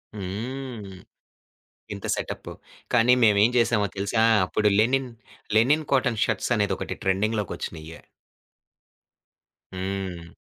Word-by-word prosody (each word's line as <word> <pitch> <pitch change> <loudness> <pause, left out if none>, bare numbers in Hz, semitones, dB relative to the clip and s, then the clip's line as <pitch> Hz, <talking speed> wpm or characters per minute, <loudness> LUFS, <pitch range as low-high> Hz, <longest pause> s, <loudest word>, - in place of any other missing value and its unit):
హ్మ్. 110 +4 -5 1.1
ఇంత - - -8
సెటపు. - - -6 0.4
కానీ 120 +1 +5
మేమేం 105 0 +5
జేసామో 115 -3 +2
తెలుసా? 100 +3 +1 0.2
అప్పుడు 105 +3 0
లెనిన్, 130 +3 +2 0.5
లెనిన్ 145 +7 +3
కాటన్ 125 -4 +1
షర్ట్సనేది 105 -4 0
ఒకటి - - -5
ట్రెండింగ్‌లోకొచ్చినియే. 95 -5 -2 1.8
హ్మ్. 95 -3 -5
105 Hz, 85 wpm, -25 LUFS, 95-120 Hz, 1.8 s, కానీ